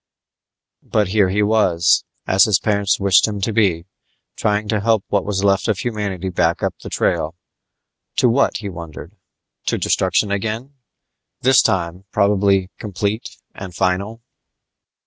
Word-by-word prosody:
But 105 -3 0
here 100 -2 +3
he 105 +3 +1
was, 100 -5 +2 0.2
as 95 +1 +4
his 105 -4 +3
parents 100 -2 +1
had - - -7
wished 100 +1 +5
him 105 -2 -4
to 110 +3 -1
be, 95 -6 +1 0.5
trying 105 0 -1
to 110 - +1
help 110 -1 +1
what 100 -2 0
was 100 -1 -2
left 100 -1 +2
of 110 -4 +1
humanity 100 -5 -3
back 85 -1 0
up - - 0
the - - -9
trail. 80 +2 -1 0.8
To - - +3
what, 125 +4 +2
he 105 - -6
wondered? 85 -4 -9 0.5
To - - +1
destruction 95 +2 +1
again 110 +7 -3 0.7
this 130 0 +5
time, 90 +1 -1
probably 100 -2 +2
complete 105 +2 -3 0.2
and 95 -3 -9
final? 100 +7 -1
100 Hz, 145 wpm, -19 LUFS, 95-105 Hz, 0.8 s, wished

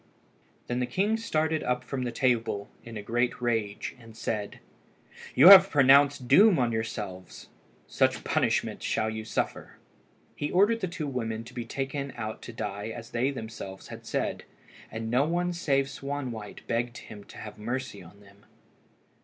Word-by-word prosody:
Then 120 0 -2
the 125 - 0
king 205 - +1
started 160 -8 0
up 125 0 -1
from 130 +1 -4
the 125 -1 -2
table 115 -6 0
in 115 -2 -8
a 105 - -6
great 120 +3 0
rage, 115 -4 -2
and 115 -2 -14
said 105 -3 -3 0.8
"You 150 +8 +9
have 195 0 +11
pronounced 140 -3 +5
doom 200 - +6
on 120 -3 +1
yourselves. 105 -5 -5 0.4
Such - - +1
punishment - - 0
shall 110 -1 0
you 110 0 -5
suffer!" 110 - -3 0.6
He 145 - -3
ordered 205 +5 +3
the 185 - -2
two 165 -3 -5
women 115 -5 -3
to 120 +2 -13
be 120 -2 -5
taken 135 +2 -4
out 110 -2 -5
to - - -8
die 105 -2 -5
as 115 0 -8
they 120 +3 +1
themselves 110 -7 -7
had - - -10
said, - - -2 0.5
and 110 0 -5
no 125 +3 +4
one 175 +2 0
save 140 -5 +1
Swanwhite 135 -6 -6
begged 120 +1 -2
him 105 -2 -11
to - - -14
have 105 0 -9
mercy 120 0 -4
on 90 +4 -15
them. 100 0 -20
120 Hz, 165 wpm, -28 LUFS, 110-140 Hz, 0.8 s, have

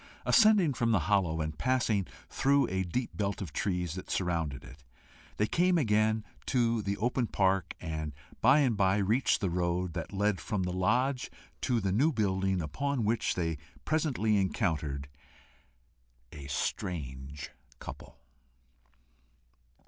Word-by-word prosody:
Ascending 210 -9 +5
from 115 -2 +1
the 100 -6 +3
hollow, 90 -6 +2
and 75 -1 -4
passing 120 -6 +1 0.2
through 140 +1 +2
a 95 0 -1
deep 105 +8 -3
belt 100 -1 -1
of 85 -8 -6
trees 90 -1 -1
that 95 - -8
surrounded 85 -7 -1
it, 70 +3 -13 0.5
they 105 - +3
came 175 +9 +2
again 110 -4 +2 0.2
to 115 -3 +2
the 100 0 -2
open 120 +1 0
park, 95 -3 +1
and 80 -4 -4 0.3
by 130 +6 +6
and 125 -5 +2
by 95 0 +3
reached 110 +7 +2
the 95 - +1
road 90 0 -1
that 85 0 -5
led 100 0 0
from 100 -3 -2
the 90 0 -2
lodge 125 +8 +1 0.3
to 125 -2 +1
the 95 -3 -1
new 135 +12 +3
building, 95 - 0
upon 135 - -2
which 110 +2 +1
they 80 -4 -1 0.3
presently 135 -9 +1
encountered 80 -8 -1 1.2
a 70 -2 -9
strange 70 -1 -4 0.3
couple. - - -10
100 Hz, 140 wpm, -30 LUFS, 85-120 Hz, 1.2 s, by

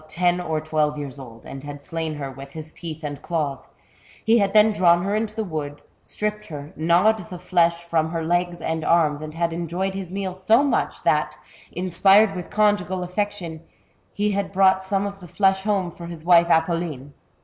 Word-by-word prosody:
77 175 +2 +2
ien 180 - -4
or 155 -1 0
twelve 155 -1 0
years 140 -2 -6
old, 115 -4 -12
and 135 0 -8
had 145 -1 -8
slain 160 -1 -3
her 140 -2 -5
with 135 +1 -11
his 155 0 -8
iieeth 160 -2 -7
and 145 -1 -5
claws; 150 -5 -3 0.6
he 230 +1 +5
had 200 -1 +2
then 215 +1 +6
drawn 175 -4 +4
her 200 +1 -1
into 215 0 -2
the 220 - -1
wood, 150 -6 -5 0.2
stripped 210 0 -4
her, 145 -2 -8
gnawed 175 +5 +2
the 180 - -7
flesh 170 -1 +1
from 165 -2 0
her 165 -1 -3
legs 175 +1 0
and 160 0 -2
arms, 155 -3 +2
Mid 155 0 -7
had 170 0 0
enjoyed 175 +3 -2
his 190 -2 -5
meal 195 -1 -3
so 215 +8 +3
much, 285 - -1
that, - - +1 0.3
inspired 195 +3 +4
with 180 -1 -6
conjugal 205 -3 +1
affection, 180 -3 -3 0.5
he 205 +1 0
had 200 -1 -2
brought 190 0 +4
some 195 +1 0
of 200 -1 -6
the 180 - -11
flesh 190 +2 +1
borne 195 -4 0
for 170 +1 -10
his 170 -2 -9
wife 170 -1 +6
Apolline. 160 -4 0
175 Hz, 195 wpm, -23 LUFS, 155-195 Hz, 0.6 s, then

